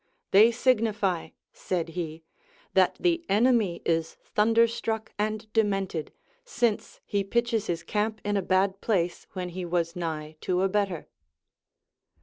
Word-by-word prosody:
They 210 Hz, +4 st, +8 dB
signify, 220 Hz, -7 st, +1 dB, 0.2 s
said 170 Hz, -3 st, -2 dB
he, 160 Hz, -1 st, -5 dB, 0.5 s
that -, -, +3 dB
the 345 Hz, -2 st, +1 dB
enemy 215 Hz, -4 st, +2 dB
is 165 Hz, -1 st, 0 dB, 0.2 s
thunderstruck 225 Hz, 0 st, +2 dB
and 215 Hz, +1 st, -2 dB
demented, 195 Hz, -7 st, 0 dB, 0.3 s
since 240 Hz, -, -1 dB
he 200 Hz, -1 st, 0 dB
pitches 235 Hz, +1 st, 0 dB
his 170 Hz, -1 st, -2 dB
camp 215 Hz, +4 st, -1 dB
in 205 Hz, 0 st, 0 dB
a 200 Hz, -, +2 dB
bad 190 Hz, +1 st, +1 dB
place, 180 Hz, -6 st, 0 dB
Avhen 180 Hz, -1 st, -4 dB
he 185 Hz, +1 st, -5 dB
w^as 170 Hz, 0 st, -1 dB
nigh 155 Hz, -3 st, -4 dB
to 180 Hz, 0 st, 0 dB
a 195 Hz, -, +2 dB
better. 195 Hz, -4 st, -1 dB
200 Hz, 130 wpm, -27 LUFS, 175-220 Hz, 0.5 s, They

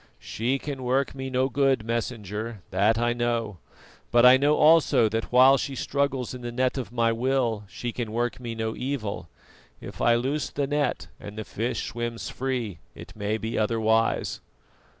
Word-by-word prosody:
"She 125 Hz, +5 st, -2 dB
can 140 Hz, -1 st, -6 dB
work 130 Hz, +2 st, 0 dB
me 135 Hz, -1 st, -5 dB
no 130 Hz, 0 st, +1 dB
good, 135 Hz, -4 st, +1 dB
Messenger, 110 Hz, -2 st, -4 dB
that 105 Hz, +4 st, +3 dB
I 120 Hz, 0 st, +1 dB
know; 115 Hz, -5 st, -2 dB, 0.5 s
but 120 Hz, +1 st, +5 dB
I 125 Hz, +1 st, +9 dB
know 145 Hz, +3 st, +3 dB
also 155 Hz, -7 st, +5 dB
that 110 Hz, +1 st, -3 dB
while 130 Hz, +2 st, +7 dB
she 135 Hz, -, -3 dB
struggles 135 Hz, -2 st, -1 dB
in 125 Hz, -, -8 dB
the 120 Hz, 0 st, -5 dB
net 130 Hz, +1 st, 0 dB
of 130 Hz, -4 st, -5 dB
my 115 Hz, -1 st, +2 dB
will 120 Hz, -3 st, 0 dB
she 120 Hz, +4 st, -5 dB
can 115 Hz, -2 st, -4 dB
work 120 Hz, +2 st, -1 dB
me 120 Hz, -2 st, -5 dB
no 110 Hz, 0 st, -3 dB
evil. 125 Hz, -6 st, -4 dB, 0.5 s
If -, -, -9 dB
I 120 Hz, -, +4 dB
loose 135 Hz, +5 st, -1 dB
the 140 Hz, -, -2 dB
net 145 Hz, -1 st, -1 dB
and 105 Hz, +1 st, -9 dB
the 110 Hz, -, -5 dB
fish 115 Hz, +5 st, -3 dB
swims 120 Hz, -1 st, -4 dB
free, 125 Hz, -9 st, -3 dB, 0.2 s
it -, -, -11 dB
may 105 Hz, +1 st, -1 dB
be 110 Hz, +1 st, -3 dB
otherwise." 110 Hz, +1 st, +1 dB
120 Hz, 175 wpm, -26 LUFS, 110-130 Hz, 0.5 s, I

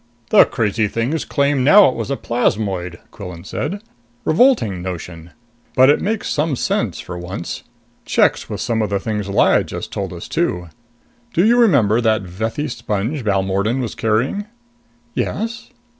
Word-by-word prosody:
"The -, -, +8 dB
crazy 110 Hz, -1 st, 0 dB
things 120 Hz, +9 st, -2 dB
claim 140 Hz, -2 st, +1 dB
now 195 Hz, +8 st, +8 dB
it 130 Hz, -, +1 dB
was -, -, -4 dB
a 140 Hz, -, -1 dB
plasmoid," 95 Hz, -7 st, -1 dB
Quillan 90 Hz, -4 st, -9 dB
said, 195 Hz, -, -4 dB, 0.4 s
"Revolting 155 Hz, -, +3 dB
notion! 85 Hz, -2 st, -7 dB, 0.5 s
But 130 Hz, +2 st, +7 dB
it -, -, +1 dB
makes 215 Hz, +2 st, -2 dB
some 150 Hz, -1 st, 0 dB
sense -, -, -1 dB
for 90 Hz, -1 st, -7 dB
once. 90 Hz, 0 st, -6 dB, 0.4 s
Checks -, -, +1 dB
with -, -, -4 dB
some 115 Hz, -2 st, 0 dB
of 110 Hz, -, -1 dB
the 100 Hz, -1 st, 0 dB
things 105 Hz, -1 st, -3 dB
Lyad 100 Hz, -, +3 dB
just -, -, -6 dB
told -, -, -4 dB
us, -, -, -8 dB
too. 90 Hz, -1 st, -1 dB, 0.6 s
Do 175 Hz, -, +3 dB
you 235 Hz, +2 st, +5 dB
remember 140 Hz, -, +4 dB
that 110 Hz, -3 st, +2 dB
Vethi 110 Hz, +11 st, -3 dB
sponge 120 Hz, +2 st, -3 dB
Balmordan 100 Hz, +3 st, 0 dB
was 120 Hz, -4 st, -3 dB
carrying?" 115 Hz, -, 0 dB, 0.7 s
"Yes." 230 Hz, +3 st, -3 dB
110 Hz, 155 wpm, -19 LUFS, 95-145 Hz, 0.7 s, The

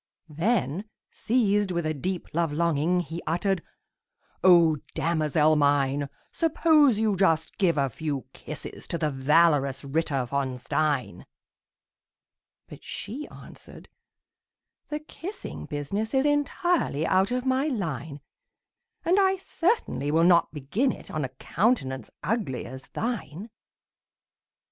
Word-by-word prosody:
Then, 175 Hz, -, 0 dB, 0.3 s
seized 210 Hz, -4 st, +1 dB
with 170 Hz, -2 st, -1 dB
a 155 Hz, -, 0 dB
deep 180 Hz, +5 st, -3 dB
love 165 Hz, -1 st, +1 dB
longing, 170 Hz, +2 st, +1 dB
He 165 Hz, +1 st, -6 dB
uttered, 175 Hz, +3 st, 0 dB, 0.8 s
"O 170 Hz, -4 st, +6 dB, 0.2 s
damosel 155 Hz, -2 st, +2 dB
mine, 140 Hz, -1 st, +2 dB, 0.2 s
Suppose 310 Hz, -6 st, +4 dB
you 215 Hz, -2 st, +1 dB
just 165 Hz, -4 st, +1 dB
give 175 Hz, -6 st, +3 dB
a 140 Hz, -1 st, +2 dB
few 140 Hz, +1 st, -4 dB
kisses 155 Hz, -, -8 dB
To 170 Hz, -, -2 dB
the 155 Hz, -2 st, 0 dB
valorous 140 Hz, 0 st, +3 dB
Ritter 140 Hz, -2 st, -1 dB
von 130 Hz, 0 st, -2 dB
Stein!" 135 Hz, -, -1 dB, 1.4 s
But -, -, -12 dB
she 265 Hz, +9 st, -6 dB
answered, -, -, -13 dB, 1.0 s
"The 300 Hz, 0 st, -3 dB
kissing 345 Hz, +6 st, -8 dB
business 195 Hz, -, -3 dB
Is 265 Hz, +1 st, +3 dB
entirely 290 Hz, -, +1 dB
out 190 Hz, +2 st, +3 dB
of 250 Hz, +1 st, -2 dB
my 260 Hz, +3 st, +1 dB
line; 160 Hz, -, -4 dB, 0.8 s
And 360 Hz, +4 st, +4 dB
I 385 Hz, -1 st, +4 dB
certainly 365 Hz, -, -1 dB
will 160 Hz, +2 st, +3 dB
not 170 Hz, -1 st, +5 dB
begin 165 Hz, -, 0 dB
it -, -, -10 dB
On 155 Hz, -2 st, -2 dB
a 130 Hz, -, -3 dB
countenance 130 Hz, -, -1 dB
ugly 190 Hz, -, -2 dB
as 130 Hz, +2 st, -9 dB
thine!" 220 Hz, -4 st, -4 dB
170 Hz, 120 wpm, -26 LUFS, 145-225 Hz, 1.4 s, O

